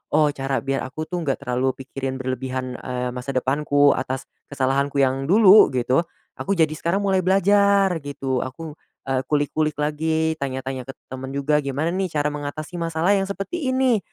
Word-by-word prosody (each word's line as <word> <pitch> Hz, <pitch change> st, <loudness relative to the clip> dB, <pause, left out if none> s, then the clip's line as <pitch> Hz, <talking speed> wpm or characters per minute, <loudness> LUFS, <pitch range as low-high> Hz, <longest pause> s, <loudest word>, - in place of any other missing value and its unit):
oh 150 Hz, -1 st, +4 dB
cara 135 Hz, -3 st, -2 dB
biar 135 Hz, 0 st, -1 dB
aku 155 Hz, +4 st, -5 dB
tuh 180 Hz, +2 st, -4 dB
nggak 140 Hz, -4 st, -2 dB
terlalu 125 Hz, 0 st, 0 dB
pikirin 135 Hz, -1 st, -4 dB
berlebihan, 130 Hz, -1 st, -4 dB
eee, 125 Hz, 0 st, -3 dB
masa 125 Hz, +2 st, -5 dB
depanku 145 Hz, +2 st, +3 dB
atas 130 Hz, 0 st, -2 dB, 0.2 s
kesalahanku 140 Hz, 0 st, 0 dB
yang 135 Hz, +1 st, 0 dB
dulu 205 Hz, +2 st, +7 dB
gitu, 125 Hz, +2 st, +2 dB, 0.4 s
aku 195 Hz, 0 st, -1 dB
jadi 160 Hz, -2 st, +3 dB
sekarang 170 Hz, +6 st, -1 dB
mulai 195 Hz, -1 st, +2 dB
belajar 195 Hz, +1 st, +4 dB
gitu. 140 Hz, -3 st, -3 dB
Aku, 150 Hz, +4 st, -7 dB, 0.3 s
eee, 135 Hz, -1 st, +1 dB
kulik-kulik 150 Hz, 0 st, 0 dB
lagi 160 Hz, +2 st, 0 dB
tanya-tanya 130 Hz, -1 st, -4 dB
ke -, -, -5 dB, 0.2 s
temen 130 Hz, 0 st, -6 dB
juga, 140 Hz, +2 st, +1 dB
"Gimana 140 Hz, +4 st, -1 dB
nih, 185 Hz, -1 st, -2 dB
cara 150 Hz, -2 st, 0 dB
mengatasi 150 Hz, +3 st, -6 dB
masalah 165 Hz, +2 st, 0 dB
yang 195 Hz, -, +1 dB
seperti 260 Hz, -, -3 dB
ini, 260 Hz, -3 st, +3 dB
145 Hz, 165 wpm, -23 LUFS, 130-170 Hz, 0.4 s, dulu